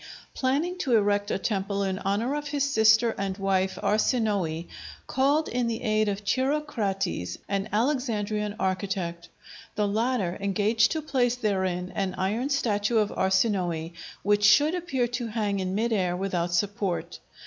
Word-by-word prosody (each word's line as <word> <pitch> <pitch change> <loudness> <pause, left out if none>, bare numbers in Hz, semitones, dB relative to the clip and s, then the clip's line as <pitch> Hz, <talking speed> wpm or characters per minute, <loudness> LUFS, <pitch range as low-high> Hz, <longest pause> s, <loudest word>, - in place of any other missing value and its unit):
planning 290 +7 0
to 260 -9 +2
erect 205 -1 +2
a - - 0
temple 200 0 -1
in 190 -1 -2
honor 210 +7 -1
of 295 0 -3
his 285 -1 -1
sister 220 -2 +4
and 195 -1 -2
wife 190 -1 0
Arsinoë, 205 -7 +1 0.4
called 285 +4 +2
in 245 -1 -1
the 230 0 -3
aid 215 -2 +2
of 200 +1 -4
Chirocrates, 225 - -1
an 200 +1 -2
Alexandrian 215 -4 0
architect. 185 -3 -2 0.5
The 210 -1 +1
latter 215 -3 0
engaged 210 +3 +2
to 315 -1 -3
place 250 -5 +1
therein 190 -5 -1
an 195 -2 -2
iron 210 +8 -1
statue 230 -5 +1
of 210 -2 +2
Arsinoë 190 -4 0 0.3
which 205 +1 +2
should 290 +10 +6
appear 335 -9 -1
to 245 -1 -3
hang 210 -3 -1
in 185 0 -2
mid 230 +2 0
air 180 -4 +1
without 180 -2 -1
support. 200 0 -1
210 Hz, 150 wpm, -26 LUFS, 195-245 Hz, 0.5 s, should